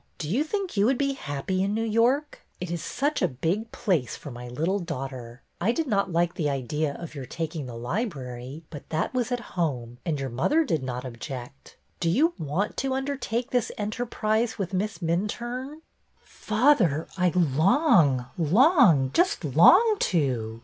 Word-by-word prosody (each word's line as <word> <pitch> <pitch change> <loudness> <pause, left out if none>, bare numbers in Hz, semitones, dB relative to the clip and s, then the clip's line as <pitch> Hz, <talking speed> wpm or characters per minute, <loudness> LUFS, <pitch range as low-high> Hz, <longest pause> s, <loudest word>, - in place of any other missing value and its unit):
Do 150 - -5
you 230 - +1
think 385 - -3
you 200 +1 +3
would 265 0 +2
be 275 0 0
happy 185 - -3
in 200 +2 0
New 225 - 0
York? 240 +7 +1 0.2
It 180 -1 -5
is 170 -2 -3
such 290 - -1
a - - +4
big 175 - -2
place 170 - 0
for 145 - -9
my 120 0 -8
little 165 +11 -1
daughter. 135 -7 -6 0.2
I 205 +6 +3
did 320 +6 -1
not 200 -7 0
like 170 +1 +1
the 150 -4 -1
idea 140 +2 -2
of 170 -2 -8
your 135 -4 -7
taking 160 -4 -4
the 120 - -8
library, 130 - -4
but 145 -3 -10
that 160 +9 -1
was 250 -1 -1
at 245 - 0
home, 125 -9 -2
and 160 -5 -2
your 135 -2 -3
mother 290 - +2
did 165 - -1
not 125 0 -4
object. 125 +2 -8 0.2
Do 170 - +1
you 310 - +3
want 160 +7 -2
to 265 0 -1
undertake 265 -3 -2
this 245 -3 +1
enterprise 220 +1 -1
with 195 -3 -3
Miss 195 0 -2
Minturne? 240 - -3 0.2
" - - -44
'' - - -43
Father, 215 - +1
I 180 -1 +2
long, 160 - +4
long, 175 - +5
just 370 +3 +2
long 450 -2 +6
to. 120 -9 0
175 Hz, 175 wpm, -26 LUFS, -, 0.2 s, long